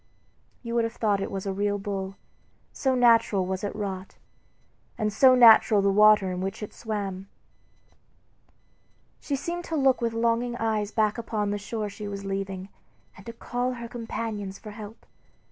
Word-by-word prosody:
You 235 -1 -5
would 235 -1 +2
have 230 0 -3
thought 205 -3 +1
it - - -3
was 195 0 -5
a 195 - -2
real 205 +1 0
bull, 195 -1 -4 0.6
so 265 -2 0
naturally 230 -6 +4
was 190 +1 -3
it 205 - -3
wrought, 195 -2 -5 0.8
and 215 -1 -1
so 255 +4 +6
natural 225 -4 +7
the 200 - +3
water 210 -2 +5
in 180 0 -4
which 195 +3 -4
it 210 - -7
swam. 200 -4 -5 1.9
She 285 - -3
seemed 345 +5 -4
to 325 - -3
look 270 -4 +3
with 230 -1 0
longing 235 +1 0
eyes 215 -3 -1
back 215 +1 0
upon 210 -3 -2
the 205 - -2
shore 215 +1 -4
she 205 +1 -7
was 200 -1 -6
leaving, 195 -1 -4 0.5
and 200 - -15
to 230 - -6
call 245 +2 -3
to - - -7
her 235 -1 -7
companions 225 -4 -5
for 215 - -10
help. 210 +1 -11
210 Hz, 175 wpm, -26 LUFS, 195-230 Hz, 1.9 s, natural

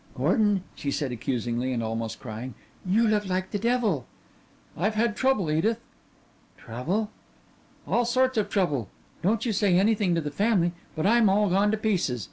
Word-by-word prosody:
"Gordon," 205 -4 +2
she 140 - -4
said 140 -1 -2
accusingly 120 +1 -2
and 120 -2 -1
almost 115 0 -3
crying, 115 +3 -7 0.3
"you 215 +5 +2
look 210 -2 +1
like 185 0 -2
the 205 - -1
devil." 225 - 0 0.7
He - - -15
nodded, 185 - +2
"I've 215 - -2
had 225 0 +1
trouble, 260 -12 +1
Edith." 215 +9 +1 0.8
"Trouble?" 180 - -3 0.8
"All 240 - +2
sorts 255 +2 +2
of 205 -1 -1
trouble. 145 - 0 0.3
Don't 205 +6 +1
you 230 - 0
say 195 -3 +3
anything 200 -2 +2
to 165 - 0
the 150 -1 -4
family, 195 0 +2 0.2
but 155 - -2
I'm 225 0 +5
all 200 0 +2
gone 200 +3 +3
to 215 - +1
pieces. 185 - 0
195 Hz, 175 wpm, -26 LUFS, 145-215 Hz, 0.8 s, I'm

